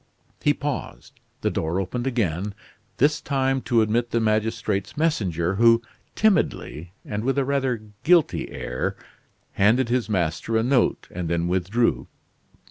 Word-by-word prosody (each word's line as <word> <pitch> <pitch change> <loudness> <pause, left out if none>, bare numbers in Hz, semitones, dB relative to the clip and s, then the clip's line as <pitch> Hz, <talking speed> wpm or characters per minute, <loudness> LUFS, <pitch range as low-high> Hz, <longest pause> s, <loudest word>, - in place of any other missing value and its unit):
He 145 -1 +3
paused; 145 -2 -5 0.2
the - - 0
door 80 +4 -1
opened 120 +7 -3
again, 100 -5 -1 0.4
this 150 +3 +2
time 135 -1 0
to 115 -3 +2
admit 115 +2 0
the 115 - +1
magistrate's 110 -1 -1
messenger, 95 - 0
who 115 +1 +5 0.3
timidly, 160 - 0
and 105 0 -3
with 135 +2 0
a 140 - +2
rather 130 -5 0 0.2
guilty 170 -1 +3
air, 60 +1 -3 0.6
handed 115 +5 +3
his 120 -2 0
master 95 +3 0
a 110 - +2
note, 125 0 +1
and 85 -2 -4
then 85 0 0
withdrew. 95 +7 0
115 Hz, 135 wpm, -24 LUFS, 95-130 Hz, 0.6 s, who